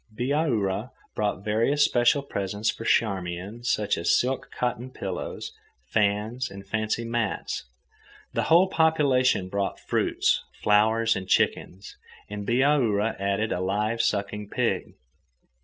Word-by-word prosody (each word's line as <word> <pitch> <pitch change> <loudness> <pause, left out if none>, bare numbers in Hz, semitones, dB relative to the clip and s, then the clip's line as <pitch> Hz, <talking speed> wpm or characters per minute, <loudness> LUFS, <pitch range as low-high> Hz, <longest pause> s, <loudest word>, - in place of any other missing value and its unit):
Bihaura 120 -4 0 0.2
brought 105 -2 -2
various 115 +8 +3
special 120 +3 +3
presents 105 -3 -2
for - - -9
Charmian, 95 +1 -1
such 105 -6 0
as 85 - +3
silk 130 +2 -2
cotton 125 0 -3
pillows, 130 - -5 0.4
fans, 105 +4 0
and 100 0 -10
fancy 110 +3 -2
mats. 115 -3 -2 0.7
The - - 0
whole 170 +4 +6
population 140 - +2
brought 100 +1 -2
fruits, - - +1 0.2
flowers, 110 +2 +3
and 95 0 -5
chickens. 95 +1 0 0.3
And 105 -1 -6
Bihaura 120 -4 +2
added 100 +2 0
a - - -1
live 105 +5 0
sucking 105 -1 -2
pig. - - -1
110 Hz, 120 wpm, -26 LUFS, 100-125 Hz, 0.7 s, whole